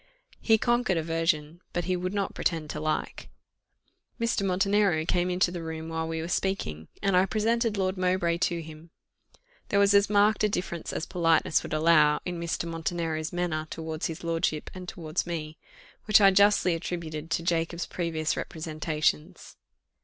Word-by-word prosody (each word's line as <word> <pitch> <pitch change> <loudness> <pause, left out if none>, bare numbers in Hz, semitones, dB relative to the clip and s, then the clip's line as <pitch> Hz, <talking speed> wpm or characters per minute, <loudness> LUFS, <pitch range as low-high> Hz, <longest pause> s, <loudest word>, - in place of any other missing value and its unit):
He 225 -1 +4
conquered 240 -5 +1
aversion, 165 0 -1
but 175 - -1
he 185 - 0
would 180 +1 -3
not 200 -1 -2
pretend 160 -3 -2
to - - -5
like. 155 0 -3 0.9
Mr. 230 -2 0
Montenero 195 -3 +2
came 175 +1 +1
into 180 0 +2
the 175 -1 -5
room 160 0 -6
while 160 0 -2
we 160 0 -3
were 165 - -4
speaking, 170 - -2 0.2
and 195 -2 +2
I 185 +1 +4
presented 225 +1 0
Lord 190 0 0
Mowbray 180 -2 +1
to 170 -2 0
him. 160 +1 -12 0.8
There 200 - +1
was 200 0 +5
as 200 0 +4
marked 210 +1 +3
a 210 - +3
difference 170 -4 -3
as 160 - -3
politeness 165 -3 +2
would - - -8
allow 155 -1 +4
in 175 -1 -4
Mr. 170 0 -2
Montenero's 165 -1 -3
manner 170 -3 -2
towards 160 -1 -4
his 165 0 -7
lordship 165 -2 -1
and 180 -1 -7
towards 165 0 -3
me, 155 -2 -5 0.5
which 215 0 +6
I 195 -1 +7
justly 200 -2 +4
attributed 165 -2 -5
to 165 0 -1
Jacob's 170 0 -1
previous 160 -3 -2
representations. 155 0 -2
170 Hz, 165 wpm, -27 LUFS, 160-190 Hz, 0.9 s, I